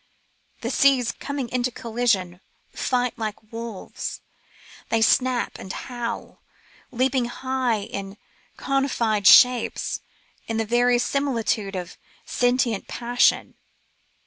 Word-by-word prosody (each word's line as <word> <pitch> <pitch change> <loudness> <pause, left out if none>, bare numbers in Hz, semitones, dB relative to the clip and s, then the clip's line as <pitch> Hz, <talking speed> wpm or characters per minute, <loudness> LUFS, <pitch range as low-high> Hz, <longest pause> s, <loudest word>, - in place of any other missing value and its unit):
The - - -2
seas, 265 -4 +3
coming 280 -3 -5
into 250 0 0
collision, 220 -7 -1 0.3
fight 250 -2 -1
like 215 0 -6
wolves. 230 -3 -6 0.7
They 225 - +2
snap 250 +1 +2
and 190 - -7
howl, 240 0 -6 0.5
leaping 255 0 +1
high 255 -2 -1
in 200 0 -7 0.4
conified 235 -7 +1
shapes 250 -2 +5 0.5
in 225 - -2
the 225 - 0
very 240 +2 +3
similitude 235 -6 -1
of 180 -1 -6 0.3
sentient 245 -4 0
passion. 245 +1 +1
240 Hz, 100 wpm, -24 LUFS, 220-250 Hz, 0.7 s, shapes